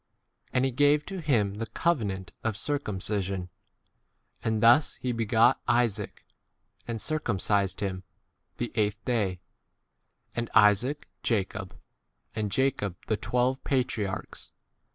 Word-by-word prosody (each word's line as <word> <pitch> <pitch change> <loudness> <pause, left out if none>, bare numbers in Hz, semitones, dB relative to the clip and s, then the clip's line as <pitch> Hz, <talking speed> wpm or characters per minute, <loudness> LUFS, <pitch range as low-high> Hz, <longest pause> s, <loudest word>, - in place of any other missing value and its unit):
And 125 +1 +2
he 135 - +1
gave 145 +3 +3
to 195 -1 -5
him 105 -9 +1
[the] 115 - -3
covenant 100 - -1
of 115 -3 -1
circumcision; 100 -8 -2 0.9
and 110 0 0
thus 120 +6 +6
he 125 - -3
begat 115 +2 +3
Isaac 115 -4 0 0.6
and 115 -1 -3
circum 135 -6 -1
cised 100 +1 +1
[him] 95 -2 -2 0.6
the 120 - -2
eighth 105 0 -1
day; 100 -8 0 0.9
and 120 -1 -2
Isaac 115 +7 +4
Jacob, 105 -5 -2 0.6
and 105 -2 -2
Jacob 110 -6 0
the 110 - +1
twelve 125 +3 +1
9 - - -41
patriarchs. 115 -7 -2
115 Hz, 120 wpm, -28 LUFS, 100-125 Hz, 0.9 s, thus